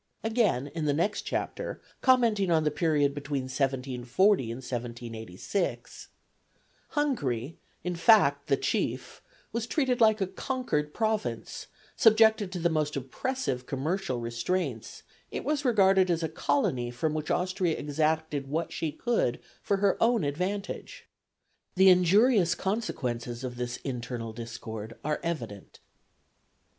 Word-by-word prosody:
" - - -42
Again, 220 - +1
in 160 -2 -2
the 145 -1 +2
next 200 +7 0
chapter, - - -3 0.2
commenting 230 -7 +3
on 160 -2 +3
the 150 - +1
period 150 -3 +2
between 140 -1 -3
1740 130 - +1
and 115 - -5
1786: 120 - -4 0.8
"Hungary, 160 - -1 0.2
in 180 0 -2
fact 165 -7 +4
the 140 -2 +3
chief, - - -2 0.3
was 230 0 -2
treated 255 -3 0
like 220 -1 +5
a 195 - +1
conquered 190 - -2
province; 210 - -2 0.3
subjected 220 -3 +5
to 185 - -4
the 170 0 +2
most 155 -2 0
oppressive 140 - -3
commercial 140 -1 -2
restraints, 120 +2 -3 0.3
it - - -5
was 295 0 0
regarded 195 -6 +4
as 170 -1 +1
a - - +1
colony 140 -5 0
from 125 +6 -2
which 155 0 -3
Austria 180 -2 0
exacted 155 -1 -1
what 160 +4 -2
she 160 - -2
could 220 - 0 0.2
for 200 - 0
her 195 -1 +1
own 230 -4 +3
advantage. 190 - -3 0.7
The 190 +1 +7
injurious 185 +2 +5
consequences 125 - -3
of 125 -1 -4
this 120 0 -4
internal 120 -3 -4
discord 115 -1 -7
are 150 0 0
evident." 120 - -5
155 Hz, 130 wpm, -28 LUFS, 130-200 Hz, 0.8 s, The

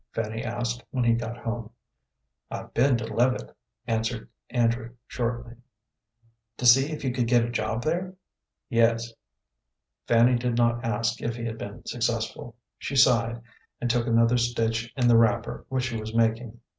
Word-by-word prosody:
Fanny 110 0 -3
asked, 120 0 -3
when 130 -2 -1
he 115 -1 +4
got 115 0 -3
home. 115 -1 -4 0.8
"I've - - -7
been 125 +1 +3
to 115 -1 -5
Leavitt," 120 - 0 0.3
answered 115 0 -2 0.2
Andrew, 115 0 0
shortly. 120 0 -4 1.0
"To 125 - -4
see 135 +5 +6
if 155 -2 -5
you 130 - 0
could 125 -2 0
get 120 -1 +4
a 120 - -4
job 110 0 -2
there?" 180 +4 -2 0.5
"Yes." 115 0 +2 0.9
Fanny 120 +1 +4
did 120 -1 -1
not 120 0 +2
ask 115 +1 -1
if 115 0 -2
he 115 -1 -5
had 115 -1 -4
been 100 0 -8
successful. 115 0 -2 0.2
She 140 - -4
sighed, 120 -3 +3 0.4
and 120 - 0
took 120 0 0
another 115 +1 +4
stitch 115 -1 0
in 125 -2 +3
the 120 -1 +6
wrapper 115 0 +1
which 130 -1 -1
she 120 -2 -2
was 110 +1 -6
making. 115 0 0
115 Hz, 160 wpm, -26 LUFS, 115-120 Hz, 1.0 s, see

